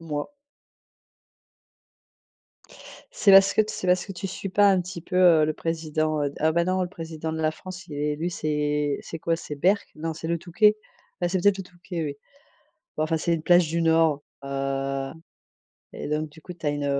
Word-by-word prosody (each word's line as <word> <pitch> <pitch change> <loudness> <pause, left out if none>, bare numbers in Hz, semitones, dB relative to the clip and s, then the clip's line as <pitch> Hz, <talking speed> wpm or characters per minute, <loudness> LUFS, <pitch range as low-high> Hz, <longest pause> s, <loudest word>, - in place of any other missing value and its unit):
Moi 150 -3 -3 2.9
C'est 200 - +4
parce 195 0 +8
que - - +3
c'est 215 - -4
parce 180 +2 +2
que 195 - -6
tu 185 +1 -5
suis 195 +1 -5
pas 200 +1 +5
un 185 -1 +3
petit 175 -2 -7
peu, 180 - -4 0.3
heu, - - +5
le 155 - 0
président, 155 -1 -1
heu 140 -1 -1
ah 160 - +3
bah 170 +1 +2
non 185 +1 +1
le 180 - -2
président 160 -3 -6
de 160 0 -3
la 155 - +3
France, 185 +3 -10
il 155 - -11
est 150 +1 -1
élu. 165 +4 -3
C'est 150 -2 -1
c'est 165 - -7
quoi, 165 +1 0
c'est 150 - -7
Berck? 190 +8 +2
Non, 160 +1 -3
c'est 160 +1 -6
le 170 0 0
Touquet. 210 +5 +3 0.4
Ah, 175 - +1
c'est 185 +1 0
peut-être 205 -1 +4
le 195 - -5
Touquet, 175 0 -11
oui. 145 -2 -3 0.8
Ouais 155 - +1
enfin, 160 +1 0
c'est 170 +2 0
une 160 -2 -2
plage 175 -1 +5
du 170 +1 -1
nord. 160 -3 +3 0.2
Heu 135 0 -2 0.8
et - - -6
donc, 150 +1 -1
du 160 +1 -16
coup 180 - -9
tu 165 -2 -10
as - - +3
une 145 0 -2
165 Hz, 205 wpm, -25 LUFS, 150-180 Hz, 2.9 s, parce